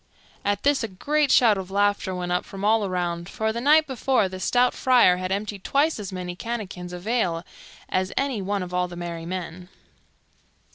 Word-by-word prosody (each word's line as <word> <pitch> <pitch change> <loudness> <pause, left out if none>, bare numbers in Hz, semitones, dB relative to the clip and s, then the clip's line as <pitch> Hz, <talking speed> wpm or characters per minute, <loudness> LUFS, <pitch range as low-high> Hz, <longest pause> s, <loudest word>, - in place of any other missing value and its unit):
At 205 0 -1
this 285 -2 +2
a - - -1
great 285 +10 0
shout 220 -5 +5
of 190 -1 -7
laughter 200 -1 +1
went 180 -1 -3
up 180 - +1
from 195 +1 -6
all 220 0 +3
around, 175 -2 -2
for 220 +1 -1
the 235 - -3
night 305 +4 +5
before 260 -5 +1
the 185 0 -7
stout 245 +5 +2
Friar 245 -8 +4
had 185 0 -4
emptied 200 0 -3
twice 290 -1 +1
as 200 -2 -6
many 180 -1 -5
canakins 195 -5 -5
of 180 +1 -8
ale 180 -8 0 0.4
as 185 0 -1
any 270 -6 0
one 200 0 -1
of 180 0 -8
all 180 0 +1
the 175 - -9
merry 170 -1 -6
men. 180 0 -6
195 Hz, 195 wpm, -24 LUFS, 180-235 Hz, 0.4 s, shout